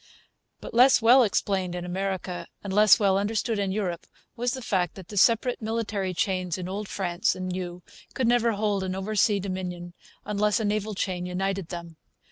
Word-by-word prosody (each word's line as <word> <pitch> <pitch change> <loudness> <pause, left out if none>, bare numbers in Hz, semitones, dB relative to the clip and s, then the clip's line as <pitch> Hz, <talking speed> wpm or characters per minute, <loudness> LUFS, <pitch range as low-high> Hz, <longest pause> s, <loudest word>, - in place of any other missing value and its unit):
But - - -8
less 250 +3 +6
well 240 +3 +6
explained 195 -4 0
in 175 0 -4
America 180 -1 -3 0.2
and 200 -2 -4
less 210 0 +6
well 195 -2 +3
understood 215 +1 -1
in 195 -1 0
Europe 185 -4 -3 0.3
was 245 +1 -1
the 260 - -7
fact 180 -6 0
that 185 -3 -11
the 210 - -8
separate 230 +5 +3
military 215 -4 -2
chains 185 -2 -1
in 180 -1 -5
Old 200 +2 -4
France 185 -2 0
and 185 0 -5
New 180 -1 -5 0.3
could 255 - +1
never 235 -1 +3
hold 205 -2 0
an 185 0 -3
oversea 205 +1 +1
dominion 180 -2 -5 0.3
unless 210 +1 +1
a 220 - -1
naval 210 0 -1
chain 180 -2 -2
united 190 0 -2
them. 170 -2 -8
195 Hz, 180 wpm, -26 LUFS, 180-215 Hz, 0.3 s, less